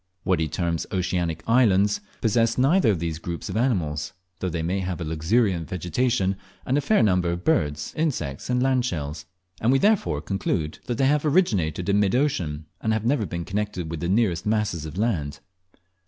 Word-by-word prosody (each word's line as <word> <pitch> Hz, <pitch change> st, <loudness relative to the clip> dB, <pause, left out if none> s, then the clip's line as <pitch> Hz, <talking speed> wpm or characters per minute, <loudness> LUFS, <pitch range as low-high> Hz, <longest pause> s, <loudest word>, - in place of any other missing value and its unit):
What 95 Hz, -3 st, +1 dB
he 80 Hz, -, +1 dB
terms 85 Hz, +1 st, -2 dB
"oceanic 85 Hz, -3 st, -1 dB
islands" 105 Hz, -4 st, +3 dB, 0.2 s
possess 115 Hz, 0 st, +2 dB
neither 140 Hz, +3 st, +4 dB
of 100 Hz, -, +2 dB
these 80 Hz, -1 st, -3 dB
groups 85 Hz, +2 st, -5 dB
of 95 Hz, -, -4 dB
animals, 90 Hz, -, 0 dB, 0.3 s
though 95 Hz, -, -1 dB
they 85 Hz, -1 st, -3 dB
may 90 Hz, +4 st, 0 dB
have 90 Hz, -2 st, -3 dB
a -, -, -3 dB
luxuriant 80 Hz, +2 st, +1 dB
vegetation, 95 Hz, +2 st, 0 dB, 0.3 s
and 130 Hz, -, +1 dB
a 145 Hz, -, +2 dB
fair 215 Hz, +9 st, +3 dB
number 90 Hz, -4 st, +2 dB
of 85 Hz, +1 st, -3 dB
birds, 75 Hz, -, 0 dB
insects, 120 Hz, -, -2 dB
and 125 Hz, 0 st, +2 dB
landshells; 120 Hz, -, -1 dB, 0.4 s
and 115 Hz, -, +3 dB
we 135 Hz, -, +5 dB
therefore 200 Hz, -, +2 dB
conclude 80 Hz, -2 st, -2 dB
that 120 Hz, -2 st, -2 dB
they 135 Hz, -, +3 dB
have 145 Hz, +1 st, +3 dB
originated 100 Hz, -, +1 dB
in 100 Hz, 0 st, +3 dB
mid 100 Hz, +2 st, +2 dB
ocean, 85 Hz, -, 0 dB, 0.2 s
and 110 Hz, -, +1 dB
have 110 Hz, 0 st, -1 dB
never 120 Hz, -5 st, +1 dB
been 85 Hz, +1 st, -4 dB
connected 100 Hz, -5 st, -3 dB
with 85 Hz, -, -4 dB
the 85 Hz, -, -2 dB
nearest 95 Hz, -5 st, +2 dB
masses 105 Hz, -7 st, -1 dB
of 75 Hz, -, -8 dB
land. 90 Hz, -10 st, -1 dB
95 Hz, 185 wpm, -24 LUFS, 85-120 Hz, 0.4 s, we